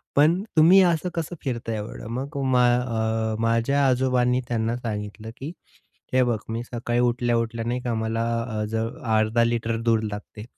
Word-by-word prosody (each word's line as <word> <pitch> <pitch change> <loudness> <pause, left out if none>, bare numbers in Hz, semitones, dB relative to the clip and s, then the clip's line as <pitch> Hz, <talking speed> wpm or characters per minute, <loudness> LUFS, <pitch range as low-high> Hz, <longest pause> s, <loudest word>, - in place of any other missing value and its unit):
पण 160 +6 +4 0.2
तुम्ही 175 +5 +8
असं 175 -1 +2
कसं 165 +1 -3
फिरताय 115 -4 -3
एवढं? 105 0 -7
मग 135 +5 -4
मा 125 -1 +4
अ, 110 -2 -1
माझ्या 115 +5 +2
आजोबांनी 125 -1 +2
त्यांना 115 -1 -1
सांगितलं 110 -1 -5
की 140 +4 -6 0.6
"हे 130 0 +5
बघ, 120 -3 +1
मी 115 +1 -3
सकाळी 120 0 -2
उठल्या-उठल्या 120 -1 0
नाही 125 +1 -1
का 120 -1 -2
मला 110 +1 -1 0.2
अ, 110 -3 -3
ज 110 - -3 0.4
अर्धा 110 +2 +2
लिटर 115 -1 0
दूध 115 -1 +2
लागते." 105 +1 -8
120 Hz, 160 wpm, -24 LUFS, 115-130 Hz, 0.6 s, तुम्ही